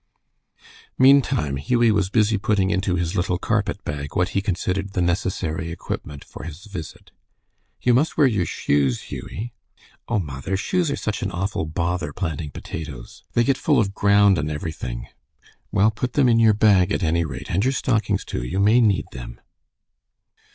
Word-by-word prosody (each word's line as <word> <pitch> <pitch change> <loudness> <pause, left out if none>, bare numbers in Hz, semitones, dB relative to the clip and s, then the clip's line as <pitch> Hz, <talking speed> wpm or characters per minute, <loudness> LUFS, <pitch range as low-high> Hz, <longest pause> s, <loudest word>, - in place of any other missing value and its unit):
Meantime 130 - +4
Hughie 115 - +2
was 100 -3 +1
busy 110 0 +2
putting 100 -2 +1
into 95 -2 0
his 90 +1 -2
little 90 -1 0
carpet 105 0 -1
bag 70 0 -5
what 90 +1 +2
he 100 - 0
considered 95 0 -2
the - - -1
necessary 85 -2 -1
equipment 75 -4 -6
for - - -11
his 85 +5 -9
visit. 95 -7 -9 0.7
"You 125 - +4
must 140 +7 +1
wear 150 - +6
your 105 -10 +1
shoes, 70 -5 +1
Hughie." 115 +4 -6 0.5
"Oh, 115 - 0
mother, 80 +2 -3
shoes 175 - 0
are 140 - 0
such 105 +2 -3
an 100 - -1
awful 95 -3 -2
bother 85 -1 -2
planting 80 -4 -3
potatoes. 70 -3 -8
They 120 - +3
get 135 +2 +1
full 150 - +3
of 100 -3 0
ground 100 -2 +4
and 75 +1 -2
everything." 75 -6 -5 0.7
"Well, 105 +2 +3
put 125 +4 -4
them 140 -3 +4
in 115 -1 +4
your 110 -2 +5
bag, 100 -3 +4
at 100 - 0
any 85 +1 +2
rate, 70 -5 -6
and 95 +4 +1
your 130 - +2
stockings, 110 -6 0
too. - - -4
You 90 +11 -2
may 110 +5 +5
need 105 -4 +2
them." - - -9
95 Hz, 170 wpm, -23 LUFS, 80-110 Hz, 0.7 s, wear